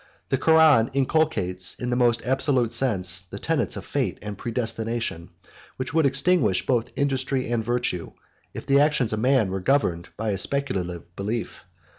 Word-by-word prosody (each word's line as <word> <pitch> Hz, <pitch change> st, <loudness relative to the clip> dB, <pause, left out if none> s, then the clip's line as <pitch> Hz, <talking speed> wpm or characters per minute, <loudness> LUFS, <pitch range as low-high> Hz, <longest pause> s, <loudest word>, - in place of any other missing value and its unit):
The 135 Hz, -, +1 dB
Koran 155 Hz, -7 st, +5 dB
inculcates, 130 Hz, -, +1 dB
in 125 Hz, 0 st, -4 dB
the -, -, +1 dB
most 120 Hz, -2 st, +2 dB
absolute 130 Hz, -2 st, +1 dB
sense, 95 Hz, -7 st, +2 dB
the 90 Hz, -, -10 dB
tenets -, -, -1 dB
of -, -, -7 dB
fate -, -, -2 dB
and 105 Hz, -1 st, -5 dB
predestination, 115 Hz, -5 st, -3 dB, 0.5 s
which 130 Hz, +2 st, -4 dB
would 160 Hz, -3 st, +3 dB
extinguish 135 Hz, -, +1 dB
both 120 Hz, -2 st, 0 dB
industry 135 Hz, -1 st, -1 dB
and 115 Hz, -2 st, 0 dB
virtue, 120 Hz, -7 st, -2 dB, 0.4 s
if -, -, -8 dB
the 140 Hz, 0 st, +4 dB
actions 145 Hz, -6 st, +2 dB
of 110 Hz, -, -1 dB
man 125 Hz, -5 st, +2 dB
were 95 Hz, -, -2 dB
governed 90 Hz, -7 st, 0 dB
by 110 Hz, -2 st, -2 dB
his 95 Hz, -1 st, +2 dB
speculative 90 Hz, -11 st, -3 dB
belief. 110 Hz, +4 st, -4 dB
120 Hz, 160 wpm, -24 LUFS, 100-135 Hz, 0.5 s, Koran